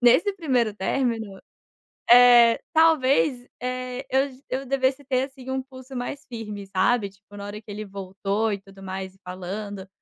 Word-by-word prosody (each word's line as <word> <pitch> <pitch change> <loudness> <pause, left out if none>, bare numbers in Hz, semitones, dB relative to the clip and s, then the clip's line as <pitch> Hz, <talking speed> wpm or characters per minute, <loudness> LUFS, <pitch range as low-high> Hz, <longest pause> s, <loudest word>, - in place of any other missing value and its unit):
Nesse 250 - +5
primeiro 250 - +1
término, 220 -2 -1 0.7
eh, 240 -1 +8
talvez, 285 -5 +3 0.2
eh, 255 +1 -4
eu 270 +2 +2 0.2
eu 265 +1 -2
devesse 270 +1 0
ter, 255 -1 +1
assim, 265 -1 -9
um 265 0 -1
pulso 260 0 -12
mais 245 +3 -4
firme, 210 -4 -7
sabe. 195 +2 +1
Tipo, 205 +1 -17
na 200 - -7
hora 210 +1 -7
que 215 - -13
ele 210 +1 -5
voltou 200 +2 -2
e 200 - -3
tudo 195 0 -16
mais 190 0 -5
e 195 - -25
falando, 190 +2 -6
235 Hz, 160 wpm, -25 LUFS, 200-260 Hz, 0.7 s, eh